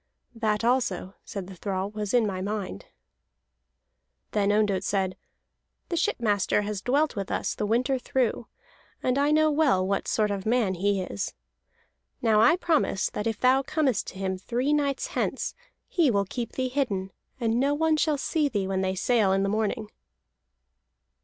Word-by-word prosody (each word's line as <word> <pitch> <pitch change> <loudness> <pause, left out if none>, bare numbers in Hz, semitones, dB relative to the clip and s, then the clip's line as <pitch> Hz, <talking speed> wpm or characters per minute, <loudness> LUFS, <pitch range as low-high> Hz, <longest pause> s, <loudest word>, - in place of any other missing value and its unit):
"That 220 -2 0
also," 230 -7 0
said 195 -3 -6
the 190 - -10
thrall, 190 +1 -3
"was 210 -1 -3
in 245 -3 +4
my 190 -3 -2
mind." 200 - -4 1.4
Then 205 -1 +2
Ondott 205 -3 +2
said: 190 -2 0 0.7
"The 345 - -1
shipmaster 215 - +1
has 205 -1 -3
dwelt 285 +6 +1
with 200 -2 -4
us - - -1
the 210 - -2
winter 255 +4 +1
through, 245 -2 -1 0.6
and 255 +2 +1
I 285 +1 +3
know 310 0 +4
well 285 -11 +3
what 195 +1 -1
sort 210 -2 +1
of 195 -1 -3
man 220 -3 +2
he 195 +1 0
is. 100 - -4 0.8
Now 220 -2 +3
I 230 - +6
promise 320 - +1
that 210 - -3
if 225 -2 -2
thou 260 +1 +4
comest 275 -6 0
to - - -8
him 190 -1 -2
three 250 +8 0
nights 285 -2 0
hence, - - -1 0.3
he 335 -6 +2
will 200 -4 +2
keep 235 +4 -5
thee 255 -1 -1
hidden, 210 -9 -1 0.3
and 230 -1 +1
no 280 +2 +2
one 320 +1 +2
shall 305 -1 +1
see 295 +1 0
thee 205 -6 -1
when 190 0 0
they 190 0 0
sail 210 0 +2
in 195 0 +2
the 195 - +1
morning." 215 0 -1
215 Hz, 170 wpm, -27 LUFS, 195-265 Hz, 1.4 s, I